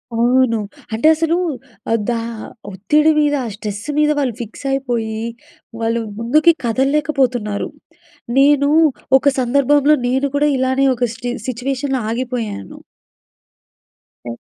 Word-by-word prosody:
అవును. 240 -1 +3 0.3
అంటే 230 +8 +2
అసలు 330 +1 0 0.6
ఆహ్, 230 - +3
దా 235 -1 0 0.5
ఒత్తిడి 300 +12 +2
మీద, 295 -1 +2
ఆ - - -3
స్ట్రెస్ 205 -1 -6
మీద, 300 0 +3
వాళ్ళు 255 -5 0
ఫిక్స్ 230 +5 -9
అయిపోయి, 235 -5 -2 0.6
వాళ్ళు 230 +1 0 0.2
ముందుకి 300 +8 +4
కదలలేకపోతున్నారు. 260 -4 0 0.7
నేను 285 +1 +4 0.5
ఒక 270 - -7
సందర్భంలో 280 +4 +3
నేను 265 +3 +1
కూడా 295 +1 +3
ఇలానే 260 +1 +1
ఒక 245 - -3
స్టి 245 +1 -5 0.2
సిట్యుయేషన్‌లో 260 +2 -2
ఆగిపోయాను. 235 - -4 1.5
ఎ - - -3
260 Hz, 110 wpm, -18 LUFS, 230-285 Hz, 1.5 s, ముందుకి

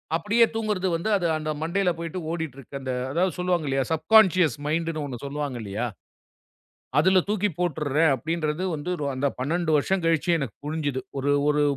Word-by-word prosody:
அப்படியே 210 +7 +4
தூங்குறது 210 -4 0
வந்து 170 +6 -2
அது 175 -2 0
அந்த 155 0 -3
மண்டையில 180 +3 +1
போயிட்டு 170 +2 -4
ஓடிட்டு 160 -6 -4
இருக்கு. 140 +2 -8
அந்த 130 - -3 0.2
அதாவது 175 +2 +1
சொல்லுவாங்க 175 -4 0
இல்லையா 135 -1 +1
சப்கான்ஷியஸ் 180 - +4
மைண்டுன்னு 160 -1 -1
ஒண்ணு 125 -2 -7
சொல்லுவாங்க 140 -3 -3
இல்லையா. 105 +4 -3 1.1
அதுல 185 +3 +5
தூக்கி 210 -1 +1
போட்டுடுறேன் 155 -2 +2
அப்படின்றது 160 +3 -2
வந்து 155 +4 -4 0.2
அந்தப் 140 +1 -1
12 160 +4 0
வருஷம் 185 +5 0
கழிச்சு 165 +1 +2
எனக்குப் 135 -4 -6
புரிஞ்சுது. 145 -4 -2 0.2
ஒரு 140 +1 +1 0.2
ஒரு 150 0 +3
160 Hz, 160 wpm, -25 LUFS, 145-180 Hz, 1.1 s, அதுல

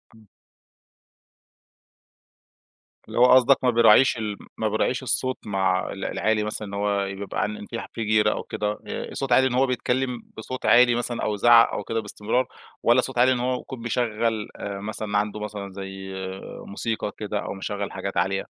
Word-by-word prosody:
امم. 110 -1 -19 2.8
اللي - - -3
هو 125 - +8
قصدك 130 +1 +6
ما 125 - +4
بيراعِيش 120 +2 +5
الم 105 -2 -3 0.2
ما 110 - 0
بيراعِيش 120 +4 0
الصوت 130 +1 +1
مع 95 -2 0
ال 95 - -5
العالي 110 -1 0
مثلًا 105 0 -4
إن 100 - -9
هو 100 0 0
يبقى 100 0 -4
عن 105 0 -4
في 115 - -5
في 115 - -3
جيرَه 105 0 +3
أو - - -3
كده 105 0 -2 0.2
آآ، - - -5
الصوت 135 -2 -4
عالي 130 +2 +5
إن 125 - -3
هو 130 +2 +3
بيتكلم 125 -1 -1
بصوت 125 +3 -6
عالي 120 0 +6
مثلًا 120 0 -2
أو 105 - 0
يزعَّق 115 +3 +6
أو - - -3
كده 115 +2 -2
بإستمرار، 110 +4 -1 0.4
والّا 120 +2 +5
صوت 130 0 -6
عالي 125 +2 +5
إن 125 - +1
هو 125 +1 0
يكون 130 -3 -9
بيشغل 115 -2 -1
آآ، 100 -1 -5
مثلًا 105 0 -3
عنده 105 +1 -1
مثلًا 105 -2 -6
زي 95 0 -7 0.6
موسيقى 110 +1 -3
كده 105 -1 -3
أو - - -4
مِشَغَّل 100 +1 -4
حاجات 95 0 -5
عالية؟ 95 +2 +1
110 Hz, 180 wpm, -24 LUFS, 100-120 Hz, 2.8 s, هو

